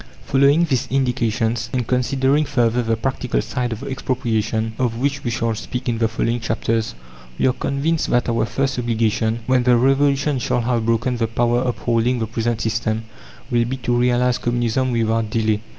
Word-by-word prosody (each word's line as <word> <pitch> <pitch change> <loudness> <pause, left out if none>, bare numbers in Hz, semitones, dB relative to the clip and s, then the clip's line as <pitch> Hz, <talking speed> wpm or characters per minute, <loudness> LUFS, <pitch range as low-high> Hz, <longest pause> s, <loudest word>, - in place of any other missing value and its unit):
Following 140 +4 +4
these 130 -4 -1
indications, 120 -3 0
and 125 -2 -1
considering 135 +4 +1
further 120 -4 +1
the 115 -1 0
practical 130 +1 -1
side 125 -2 -2
of 110 - -5
expropriation, 110 -4 -1
of 120 -3 0
which 140 +2 -1
we 120 - -1
shall 115 0 -1
speak 125 +4 -5
in 115 -2 0
the 115 - +3
following 115 +1 -1
chapters, 115 - -1 0.4
we - - +1
are 130 - +3
convinced 150 +5 -1
that 120 - +2
our 115 -2 +1
first 135 +2 -1
obligation, 115 -1 0
when 130 0 +3
the 125 0 +4
revolution 140 +2 +2
shall 120 - 0
have 115 -1 0
broken 115 +2 +1
the 115 -1 0
power 120 +2 +1
upholding 120 0 0
the 115 - -1
present 115 +1 -2
system, 110 0 -1 0.5
will 120 -1 +2
be 130 +3 -3
to 120 -1 -1
realize 125 0 +2
Communism 120 +1 0
without 115 -1 0
delay. 110 -1 0
120 Hz, 175 wpm, -20 LUFS, 115-130 Hz, 0.5 s, Following